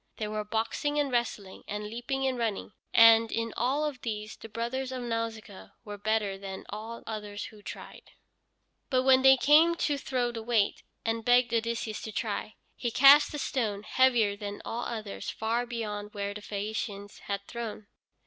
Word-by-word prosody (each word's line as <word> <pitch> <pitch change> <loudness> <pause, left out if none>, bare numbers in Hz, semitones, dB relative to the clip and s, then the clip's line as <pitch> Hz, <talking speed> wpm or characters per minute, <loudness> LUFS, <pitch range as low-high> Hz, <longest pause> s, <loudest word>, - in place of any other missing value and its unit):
There 215 -1 -3
were 215 0 -2
boxing 225 +7 -1
and 290 -2 +1
wrestling 225 -5 -2
and 210 +1 -4
leaping 245 +5 -3
and 260 -1 +1
running, 225 -3 -2 0.2
and 225 0 +7
in 230 0 -2
all 270 +6 +1
of 285 -4 -4
these 215 -2 -4
the 225 - -11
brothers 250 +4 -3
of 255 -1 -4
Nausicaa 230 -4 -5
were 205 -1 -7
better 210 -2 0
than 195 -1 -7
all 220 +3 -7
others 210 -2 -5
who 215 -1 -12
tried. - - -10 0.8
But 255 -1 +2
when 260 0 +6
they 265 0 +7
came 315 +5 +5
to 290 -4 0
throw 250 -3 -1
the 230 -1 -6
weight, 220 -3 +1 0.2
and 225 0 -1
begged 245 0 +4
Odysseus 230 -1 -1
to 220 - -6
try, 215 0 -3 0.2
he 240 - -2
cast 275 +5 +7
a - - -2
stone 215 -8 -2
heavier 235 -4 +3
than 205 0 -6
all 235 +1 -3
others, 215 -3 -5
far 230 +2 -1
beyond 210 -3 -5
where 200 0 -3
the 210 - -8
Phæacians 205 0 -5
had 200 0 -3
thrown. 225 -3 -6
225 Hz, 175 wpm, -29 LUFS, 210-245 Hz, 0.8 s, and